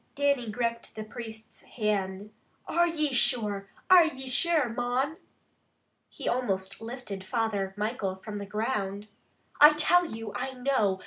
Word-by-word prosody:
Dannie 280 -5 +1
gripped 235 +1 -3
the 215 - -5
priest's 220 0 -10
hand. 205 -2 -2 0.4
"Are 345 0 +3
ye 305 -4 0
sure? 210 -5 +2 0.2
Are 365 -2 +8
ye 265 -4 -6
sure, 305 +2 +2
mon?" 245 +6 -1 0.9
He - - -7
almost 195 -6 -1
lifted 225 -4 -6
Father 205 -3 -1
Michael 210 -3 -2
from 205 +2 -7
the 200 - -6
ground. 210 -2 -2 0.5
"I 300 +1 +10
tell 350 +3 +4
you, 225 -5 -7
I 265 - -4
know! 250 -7 +1
230 Hz, 135 wpm, -28 LUFS, 205-265 Hz, 0.9 s, I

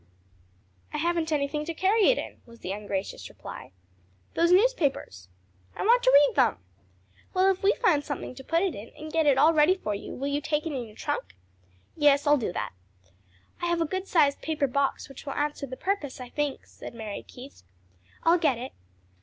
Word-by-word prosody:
"I - - -3
haven't 335 0 0
anything 295 0 0
to 335 0 -4
carry 400 +4 +3
it - - +4
in," - - -6
was 235 0 -16
the 185 - -4
ungracious 200 -1 -4
reply. - - -10 0.6
"Those 340 +1 +3
newspapers." 320 - +1 0.5
"I - - -3
want 475 +4 +5
to - - +4
read 285 0 +6
them." - - +3 0.8
"Well, 375 +1 +5
if 380 - -4
we 405 +4 +3
find 310 -11 +2
something 285 -3 -5
to 265 +1 -11
put 330 +6 +1
it 385 - 0
in, 210 +3 -9
and 310 0 -8
get 320 -2 +2
it 275 -2 +5
all 325 - +6
ready 310 +4 +5
for 210 - -3
you, 200 - -6
will 275 - -4
you 285 +1 -1
take 300 +1 -1
it 320 - -3
in 250 -4 -4
your 215 - -15
trunk?" 95 - -4 0.6
"Yes, 290 -2 +4
I'll 295 0 +6
do 220 - -2
that." - - -4 0.9
"I 345 - 0
have 345 0 +1
a 330 - +2
good 375 +4 -4
sized 285 -5 +3
paper 310 -3 0
box 275 +1 -1
which 275 +1 -12
will 275 - -2
answer 295 -1 -2
the 260 0 -7
purpose, 370 -10 -2
I 250 -1 -8
think," 295 0 -3
said - - -11
Mary 220 -3 -6
Keith. 260 +3 -13 0.6
"I'll 340 +2 +4
get 290 -7 +2
it." 255 +3 -6
295 Hz, 205 wpm, -27 LUFS, 265-340 Hz, 0.9 s, read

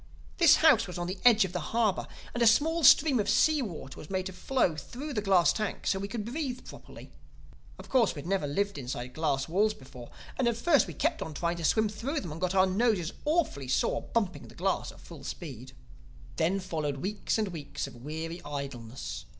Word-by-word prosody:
This 335 -3 +8
house 230 -9 +6
was 180 - -6
on 175 - -2
the 185 +2 -5
edge 225 -4 +6
of 180 - -7
the 180 - -1
harbor; 215 +5 0 0.3
and 240 - -3
a 235 - +6
small 320 +9 +3
stream 280 -3 +7
of 205 - 0
sea 310 -2 +4
water 165 - -7
was 155 - -10
made 185 -1 -2
to 190 - -5
flow 185 -2 0
through 270 - -7
the 210 - -1
glass 190 -6 +4
tank 215 -2 -3
so 190 - +1
we 200 - -3
could 210 -1 -4
breathe 255 0 -4
properly. - - -12 0.7
Of - - -11
course 240 -8 +2
we 145 - -6
had - - -9
never 190 -6 0
lived 200 +5 -1
inside 125 -1 -5
glass 140 -4 0
walls 210 +6 +2
before; 125 - -12 0.3
and 255 - +2
at 235 -1 +1
first 290 +3 +3
we - - -8
kept 320 +2 0
on 155 - -5
trying 170 +2 -1
to 170 - -6
swim 220 +7 +3
through 240 +9 -3
them 175 - -6
and 160 +3 -8
got 185 +1 0
our 190 0 +6
noses 190 -3 +1
awfully 300 - 0
sore 130 +1 +1
bumping 205 -6 -2
the - - -15
glass 190 +2 -1
at - - -16
full 160 -5 -12
speed. 130 -5 -7 0.6
"Then 190 +4 +1
followed 155 -6 -3
weeks 200 +11 -2
and 215 -2 0
weeks 150 -5 -5
of - - -9
weary 160 +6 -6
idleness. 135 -5 -6
190 Hz, 215 wpm, -29 LUFS, 155-230 Hz, 0.7 s, This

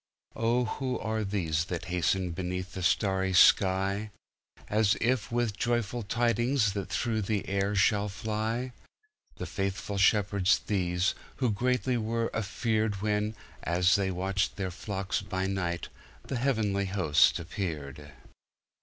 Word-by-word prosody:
Oh, 120 +2 +1
who 130 +2 -2
are 110 0 -2
these 85 -6 -1
that 90 -2 -4
hasten 90 +1 +1
beneath 90 +1 -4
the 95 - -5
starry 95 0 +1
sky, 95 +3 +4 0.6
As 105 -1 +2
if 120 -1 0
with 120 -3 0
joyful 120 +1 -1
tidings 120 +1 +1
that 100 -2 -4
through 115 -3 -1
the 105 0 -1
world 100 +1 0
shall 105 +1 +3
fly? 110 +5 -2 0.6
The - - -5
faithful 100 +1 -3
shepherds 100 -1 +3
these, 90 -2 +1 0.2
who 125 -4 +1
greatly 125 +3 0
were 115 +1 -1
afearedWhen, 105 0 -1 0.3
as 90 +3 +2
they 100 -2 +2
watched 95 +2 -1
their 95 -2 -3
flocks 95 +1 -3
by 95 -2 -3
night, 90 -3 -2 0.3
the 130 - -4
heavenly 110 -6 +1
host 95 -6 +3
appeared. 75 -5 -5
100 Hz, 125 wpm, -29 LUFS, 95-110 Hz, 0.6 s, sky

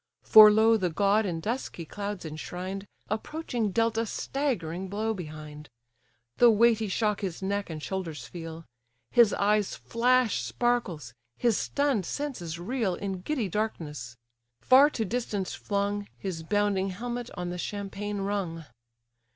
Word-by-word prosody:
For 215 -1 +10
lo! 220 +2 +5
the 185 -4 0
god 200 +5 +2
in 165 -3 -3
dusky 220 -4 -4
clouds 200 +1 -5
enshrined, 180 +5 -6 0.2
Approaching 235 0 -2
dealt 225 +3 +1
a 225 - -1
staggering 190 - -2
blow 215 +3 -1
behind. 150 -4 -8 0.7
The 240 - +7
weighty 225 0 +4
shock 210 +1 0
his 190 -2 -4
neck 200 0 -1
and 155 -2 -6
shoulders 165 -9 -4
feel; 165 -1 -8 0.5
His 235 -4 +6
eyes 210 0 +1
flash 245 0 +2
sparkles, 185 - -1 0.2
his 235 -3 +2
stunn'd 275 - 0
senses 240 - -4
reel 200 +1 -1
In 190 -1 -4
giddy 255 -1 -1
darkness; 150 - -4 0.4
far 270 +3 +6
to 225 -7 -2
distance 210 -3 -2
flung, 205 0 -2
His 185 -4 -4
bounding 200 +2 +1
helmet 240 +5 -4
on 175 0 -3
the 180 - -5
champaign 205 +1 -4
rung. 190 -5 -3
205 Hz, 135 wpm, -28 LUFS, 180-225 Hz, 0.7 s, For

